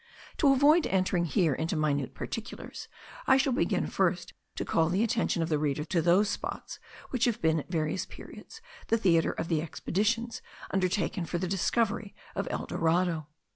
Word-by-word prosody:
To 285 -4 +5
avoid 295 +5 +5
entering 185 -2 +1
here 165 0 +2
into 160 +5 -2
minute 145 -4 0
particulars, 225 +1 -6 0.4
I 265 - +6
shall 270 -1 +2
begin 250 - +1
first - - 0 0.2
to - - -3
call 160 -1 +2
the 190 +5 +1
attention 225 -7 +1
of 165 - -3
the 155 -2 +1
reader 150 0 0
to 170 0 +1
those 175 +5 +4
spots - - -5 0.3
which 250 -3 +1
have 235 -2 0
been, 160 -5 +2
at 150 - -9
various 160 +1 -1
periods, 450 - -12 0.2
the 230 - +3
theatre 170 -6 +3
of - - -4
the 160 -3 +1
expeditions 220 +8 -1 0.3
undertaken 185 -1 0
for 175 - -2
the 185 +1 -2
discovery 205 +3 0 0.2
of - - -3
El - - -3
Dorado. 165 -2 0
180 Hz, 175 wpm, -29 LUFS, 160-225 Hz, 0.4 s, I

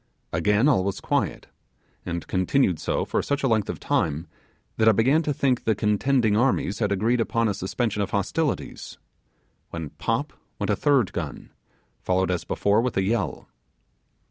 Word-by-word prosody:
Again 105 - +3
all 125 -11 +3
was 100 0 -2
quiet, - - -1 0.6
and 85 -1 -3
continued 95 - +1
so - - -1
for - - 0
such 140 0 -2
a - - +3
length 110 -4 +1
of - - -4
time 80 +2 0 0.5
that 110 0 +5
I - - +5
began 130 +9 +3
to 150 - -1
think 130 -3 +1
the 110 - +1
contending 105 +2 +2
armies 110 -4 +1
had 105 -3 0
agreed 115 +5 +1
upon 115 0 +1
a 105 - 0
suspension 105 +3 -2
of 100 - -1
hostilities; 120 - -2 0.7
when 80 -3 -6
pop - - -2 0.2
went - - -1
a - - +2
third 130 -10 +2
gun, 80 -4 -6 0.5
followed 95 0 +1
as 90 - -2
before 100 +2 +2
with 125 -3 -2
a 95 - +2
yell. 105 +1 -2
105 Hz, 170 wpm, -25 LUFS, 95-125 Hz, 0.7 s, that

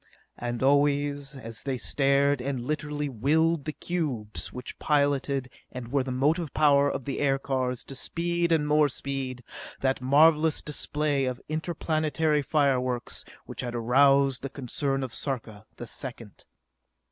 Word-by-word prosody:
And 120 +1 -3
always, 145 0 +2
as 115 -4 -8
they 135 -2 -2
stared 140 +1 +2
and 135 0 -2
literally 150 0 -2
willed 150 +5 +1
the 155 - -1
cubes 145 -12 -4
which 125 0 -8
piloted 140 -2 +1 0.2
and 125 -2 -7
were 140 -1 +2
the 130 0 -4
motive 150 +4 +1
power 145 -2 +5
of 135 - -4
the 140 - -3
aircars 135 -3 0
to - - -8
speed 170 +4 -1
and 155 -2 +3
more 150 0 +4
speed, 130 -2 -4 0.4
that 130 -1 +1
marvelous 155 +4 +4
display 150 -1 -1
of 125 -1 -3
interplanetary 155 -1 0
fireworks 130 -4 0 0.2
which - - -6
had 120 -1 -4
aroused 135 +3 +4
the 140 - -4
concern 135 +1 -2
of 125 -3 -5
Sarka 110 -6 -4
the 120 - -7
Second. 120 -3 -7
140 Hz, 140 wpm, -27 LUFS, 130-150 Hz, 0.4 s, power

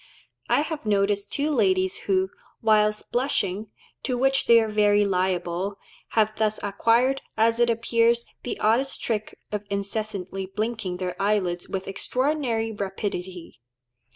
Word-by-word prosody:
I - - +4
have 310 0 -4
noticed 200 0 +1
two 295 +2 0
ladies 190 -7 +2
who, 190 0 +2 0.3
whilst 215 -1 +2
blushing, 215 -6 -1 0.3
to 250 -2 -1
which 270 +2 +2
they 230 0 +8
are 220 - +1
very 210 -1 +3
liable, 185 0 -1 0.4
have 215 -1 +2
thus 215 -1 +1
acquired, 230 +6 +2 0.2
as 230 +1 +3
it 240 0 +4
appears, 230 0 +2 0.2
the 245 - -5
oddest 240 +6 +2
trick 215 -2 -2
of 210 -1 -2
incessantly 200 -2 -3
blinking 210 -2 -3
their 180 -1 -3
eyelids 190 -4 0
with 190 -1 -4
extraordinary 250 +1 -1
rapidity. 190 -5 -5
210 Hz, 130 wpm, -25 LUFS, 195-230 Hz, 0.4 s, they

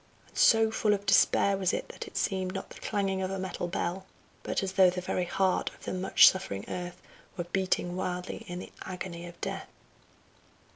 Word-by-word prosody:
And - - -26
so 225 -1 +6
full 210 -1 +2
of 200 0 -8
despair 200 0 +4
was 190 -1 +1
it - - -2
that - - -7
it - - -8
seemed 185 -1 -1
not 195 - -5
the - - -11
clanging 195 -2 -1
of 185 - -1
a 195 - -3
metal 185 -2 -3
bell, 180 +2 -3 0.3
but - - -1
as 190 - -2
though 190 -2 +6
the 180 +1 -3
very 180 0 -1
heart 190 +1 +1
of - - -19
the - - -3
much 185 0 +6
suffering 100 - 0
earth 180 0 -5 0.4
were 175 - -1
beating 180 0 -1
wildly 180 -1 -3
in 175 - -5
the 180 - -8
agony 175 -2 -6
of 175 0 -12
death. - - -4
185 Hz, 200 wpm, -29 LUFS, 180-195 Hz, 0.4 s, so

